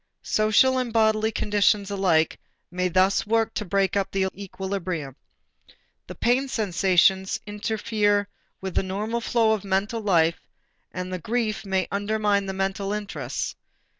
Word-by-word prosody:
Social 215 +5 +3
and 250 -2 -2
bodily 220 -1 +2
conditions 205 -1 +1
alike 180 -5 +2 0.3
may 180 +1 0
thus 185 +3 +2
work 225 0 +1
to 210 - -2
break 195 0 0
up 195 -1 0
the 190 -1 0
equilibrium. 185 -7 -5 0.9
The - - -8
pain 255 +3 +1
sensation 190 -3 +2 0.2
interferes 210 -1 0 0.4
with 190 -1 -4
the - - +2
normal 210 +5 -3
flow 230 -1 +2
of 215 -2 0
mental 200 +4 -1
life 170 -5 +2 0.5
and 185 0 -5
the 185 - -3
grief 220 +2 -2
may 190 -1 0
undermine 205 0 0
the 190 - -3
mental 195 +1 -2
interests. 210 -1 -4
200 Hz, 135 wpm, -25 LUFS, 190-215 Hz, 0.9 s, Social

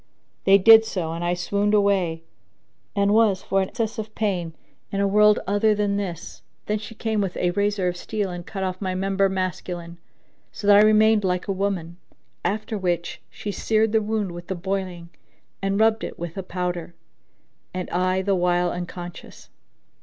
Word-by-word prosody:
They 195 0 +7
did 225 +3 +8
so, 180 -7 -3
and 170 +1 -4
I 175 +1 +1
swooned 200 +4 0
away 190 -5 +1 0.7
and 200 0 +2
was 215 -4 +3
for 195 - +1
excess 225 +3 -3
of 215 0 -6
pain 185 -6 -1 0.4
in 195 - -2
a 200 - +2
world 210 +1 +5
other 205 +2 +2
than 205 -1 0
this. 190 -5 -5 0.2
Then 210 0 -1
she 220 +2 -9
came 220 -2 -1
with 190 -3 -3
a 180 - +1
razor 200 0 0
of 180 - -1
steel 200 +1 -3
and 175 0 -6
cut 195 +2 -5
off 185 0 -3
my 185 -2 -2
member 195 +1 +1
masculine,[FN#4] 180 -2 -4 0.5
so 205 - -8
that 205 0 +7
I - - +8
remained 215 0 +5
like 180 0 -1
a - - 0
woman: 185 -3 -2 0.5
after 215 +1 -2
which 175 -2 -2
she 205 - -6
seared 220 +1 +1
the 220 0 +3
wound 210 -3 -2
with 175 0 -9
the 190 - -3
boiling 180 -2 -4 0.5
and 195 +1 0
rubbed 220 0 +3
it - - -6
with 170 -1 -6
a 195 - -3
powder, 180 -2 -4 0.8
and 185 -1 -4
I 185 +1 +1
the 200 +1 +1
while 175 -1 +1
unconscious. 175 0 -8
195 Hz, 180 wpm, -23 LUFS, 180-210 Hz, 0.8 s, did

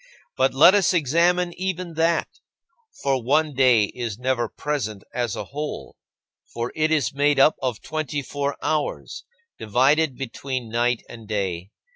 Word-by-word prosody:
But - - +1
let - - +8
us 195 -2 +3
examine 175 +4 +2
even 185 -2 -3
that, 165 +1 +1 0.8
for 135 -2 +1
one 150 +5 +1
day 125 -4 +4
is 115 0 -4
never 125 -2 -1
present 110 -9 -4
as 120 -3 -2
a - - -4
whole. 150 +2 -6 0.6
For 120 +1 -3
it 155 0 +1
is 155 -5 +1
made 145 0 +2
up 150 +3 +6
of 125 -4 -3
twenty 150 -2 -3
four 140 +1 -3
hours, 155 -2 -2 0.3
divided 135 +6 +2
between 130 -2 -5
night 120 +1 0
and 115 -2 -11
day. 95 -4 -3
135 Hz, 145 wpm, -23 LUFS, 120-155 Hz, 0.8 s, let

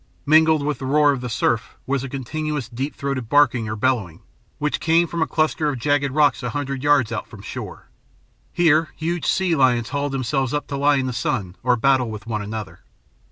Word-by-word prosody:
Mingled 155 0 +4
with 150 0 -2
the 130 - -4
roar 145 +1 +4
of 135 -3 -3
the 125 - -4
surf 115 0 -1
was 135 0 -1
a 135 - -5
continuous, 145 0 -4
deep 130 +5 -5
throated 135 -5 -3
barking 125 -6 +3
or 110 - -3
bellowing, 110 -8 -1 0.4
which 150 0 -1
came 165 +1 +3
from 170 0 -4
a - - +2
cluster 155 -1 0
of 135 - -3
jagged 145 +2 +1
rocks 145 0 +2
a 125 - -3
hundred 140 +1 -3
yards 145 -5 +3
out - - -4
from - - -13
shore. - - -8 0.6
Here 160 -2 +3
huge 170 +1 -3
sea 185 -3 +2
lions 125 -4 +2
hauled 145 -1 -2
themselves 135 +1 -1
up 145 - -2
to 140 - -3
lie 145 +1 +3
in 135 -1 0
the 130 - -3
sun 100 -6 -2
or 125 0 +3
battle 130 0 +2
with 110 0 -7
one 110 -2 -3
another. 105 +1 -6
135 Hz, 205 wpm, -22 LUFS, 120-150 Hz, 0.6 s, Mingled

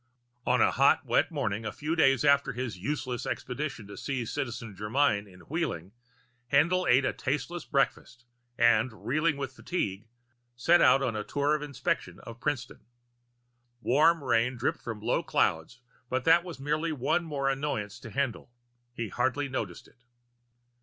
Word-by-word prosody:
On - - +3
a - - +5
hot, - - +4
wet - - +2
morning 105 +1 -2
a 110 - -3
few 155 +2 -3
days 135 -4 +4
after 140 -1 +4
his 120 -3 -4
useless 125 +2 -3
expedition 130 -3 -4
to 100 - -10
see 130 -4 -3
Citizen 115 -5 -4
Germyn 105 0 +1
in 90 0 -16
Wheeling, 100 - -3 0.6
Haendl 170 +6 +3
ate 130 +2 +5
a - - 0
tasteless 150 +6 -3
breakfast 135 -4 -1 0.3
and, 115 0 +2
reeling 155 +3 +1
with 135 -2 -4
fatigue, 105 - -3 0.5
set 165 +9 +4
out 135 - +5
on 120 -4 -1
a 105 - -2
tour 145 +5 0
of 150 - 0
inspection 145 -3 -2
of 115 0 -10
Princeton. 130 -3 -3 1.0
Warm 155 +6 +4
rain 125 0 +2
dripped 120 - -1
from 110 -3 -6
low 115 +3 +1
clouds, 80 +10 0 0.3
but 130 0 -1
that 165 +1 +6
was 175 -5 -8
merely 150 +4 -1
one 145 +4 0
more 145 -4 -2
annoyance 135 -7 -2
to - - -9
Haendl. 135 0 -2 0.5
He 115 -3 -3
hardly 135 +7 0
noticed 110 -9 -4
it. 125 - -26
130 Hz, 160 wpm, -29 LUFS, 115-150 Hz, 1.0 s, that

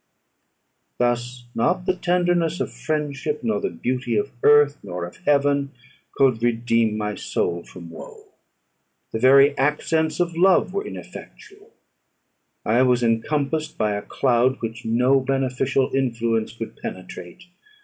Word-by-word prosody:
Thus 120 0 -1
not 180 +10 0
the 185 - +1
tenderness 175 -2 +1
of - - -3
friendship, 150 -1 -3
nor 110 -3 0
the - - -1
beauty 125 +7 -2
of 105 - -1
earth, 145 0 +5
nor 90 -3 -5
of 85 - -12
heaven, 140 -1 +2 0.4
could 130 -5 +3
redeem 115 -2 +1
my 105 -1 -2
soul 85 -3 -2
from 85 -2 -12
woe: 85 - -12 0.8
the 110 - -3
very 140 +3 +6
accents 155 +3 0
of 170 -1 0
love 185 +2 +3
were 405 +1 -3
ineffectual. 410 +1 -11 1.0
I 115 +4 +3
was 125 -1 +3
encompassed 145 +7 -1
by 105 -1 +1
a 100 - -3
cloud 130 +3 +1
which 115 +1 -6
no 125 +4 +3
beneficial 135 0 0
influence 115 -4 0
could 115 0 -8
penetrate. 90 - -8
130 Hz, 130 wpm, -22 LUFS, 115-150 Hz, 1.0 s, very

